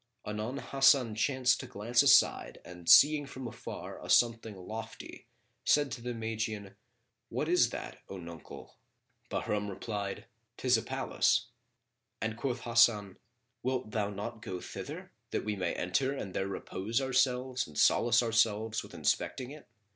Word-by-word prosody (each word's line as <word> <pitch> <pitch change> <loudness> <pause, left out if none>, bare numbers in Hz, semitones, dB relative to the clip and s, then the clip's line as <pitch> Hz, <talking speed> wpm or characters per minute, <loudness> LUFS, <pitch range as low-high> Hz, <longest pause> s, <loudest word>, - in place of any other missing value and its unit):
Anon 105 +5 -4
Hasan 135 -4 +3
chanced 125 +3 +2
to 130 - -7
glance 120 +1 +1
aside 135 -2 +4
and 90 -1 -7
seeing 145 0 +7
from 130 -1 -7
afar - - -8
a - - -9
something 115 -3 +3
lofty 110 +4 -8 0.4
said 145 -2 +3
to 120 - -5
the 120 0 -4
Magian, 110 -3 -4 0.5
"What 150 - -2
is 175 +2 +4
that, - - -7
O 95 - -6
nuncle?" 85 -3 -11 0.5
Bahram 105 -1 -2
replied, 100 0 -5 0.3
"'Tis 125 -1 +3
a 115 - +1
palace," - - 0 0.7
and 110 0 -2
quoth 120 0 -3
Hasan, 115 -5 +3 0.4
"Wilt 125 -3 -2
thou 105 -2 -1
not 105 +3 -6
go 90 -3 -5
thither, - - -8 0.2
that - - -2
we 105 -1 -1
may 95 - -2
enter 130 +10 0
and 95 -8 -6
there 95 - -1
repose 100 +3 -3
ourselves 130 -1 +1
and 75 -1 -12
solace 120 +1 +4
ourselves 110 -1 +1
with - - -12
inspecting 130 0 -1
it?" 150 0 -12
115 Hz, 145 wpm, -31 LUFS, 105-130 Hz, 0.7 s, seeing